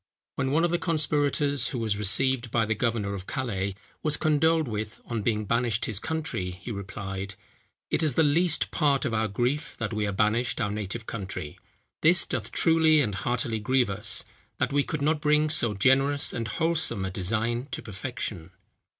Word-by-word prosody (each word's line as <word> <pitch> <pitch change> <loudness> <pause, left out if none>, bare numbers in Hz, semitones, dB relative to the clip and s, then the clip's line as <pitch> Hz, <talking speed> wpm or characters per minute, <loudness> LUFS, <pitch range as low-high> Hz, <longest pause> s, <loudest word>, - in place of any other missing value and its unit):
When 130 -1 -1
one 155 +4 +2
of 175 - +2
the 175 - +1
conspirators, 145 -4 +1
who 130 - -3
was 110 -3 0
received 120 +5 +1
by 115 0 +1
the 110 - 0
governor 110 -2 -1
of 95 -1 -7
Calais, 100 -7 -2 0.3
was 150 -1 0
condoled 160 0 +2
with, 110 -1 -4
on 115 -2 -3
being 110 -1 0
banished 115 0 +1
his 105 -3 -2
country, 160 -11 -3
he 90 +6 -8
replied, 95 -1 -5 0.6
"It - - +1
is 150 -6 +1
the 160 - +4
least 160 +3 +2
part 145 -4 +2
of 115 - -1
our 110 0 +1
grief 125 +10 -1
that 115 -1 -3
we 105 -1 0
are - - -1
banished 105 +5 +1
our 105 -3 0
native 105 +2 -4
country; 95 -9 -6 0.4
this 175 +3 +6
doth - - -3
truly 160 -2 +4
and 110 -8 +1
heartily 115 +2 -1
grieve 125 0 +2
us, 100 +1 +1 0.3
that - - 0
we 145 - +4
could 150 0 -3
not 155 0 +1
bring 150 0 +3
so 115 -8 +2
generous 135 +7 +3
and 115 -2 -3
wholesome 160 - +1
a 95 - -3
design 115 +7 -1
to - - -5
perfection." 105 -4 -5
120 Hz, 185 wpm, -27 LUFS, 105-145 Hz, 0.6 s, this